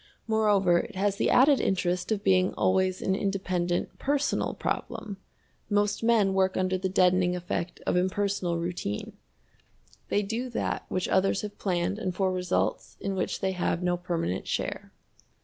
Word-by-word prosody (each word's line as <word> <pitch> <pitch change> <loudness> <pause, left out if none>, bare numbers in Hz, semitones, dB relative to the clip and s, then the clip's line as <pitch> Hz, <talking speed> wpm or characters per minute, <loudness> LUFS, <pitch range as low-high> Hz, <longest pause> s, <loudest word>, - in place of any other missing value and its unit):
Moreover, 205 -5 +3
it - - -6
has 200 +1 0
the - - +1
added 275 +2 +5
interest 180 0 0
of 205 -2 0
being 185 -1 +3
always 185 0 +1
an 190 - +1
independent 185 -3 -1
personal 285 +1 0
problem. 220 -4 -4 0.5
Most 205 0 +1
men 225 -4 +3
work 190 0 +2
under 185 0 +1
the 185 0 -1
deadening 180 -1 +3
effect 175 0 -4
of - - +1
impersonal 185 -1 0
routine. 170 - -4 1.0
They 205 - +1
do 230 +5 -3
that 240 - -3
which 185 -1 -1
others 195 +1 +2
have 210 -1 -7
planned 185 +1 -1
and 185 -4 -3
for 190 -1 +1
results 180 -1 -1
in 195 - -2
which 185 - -2
they 190 - +1
have 180 -1 -1
no 180 0 +2
permanent 170 - -3
share. - - -3
190 Hz, 155 wpm, -28 LUFS, 180-205 Hz, 1.0 s, added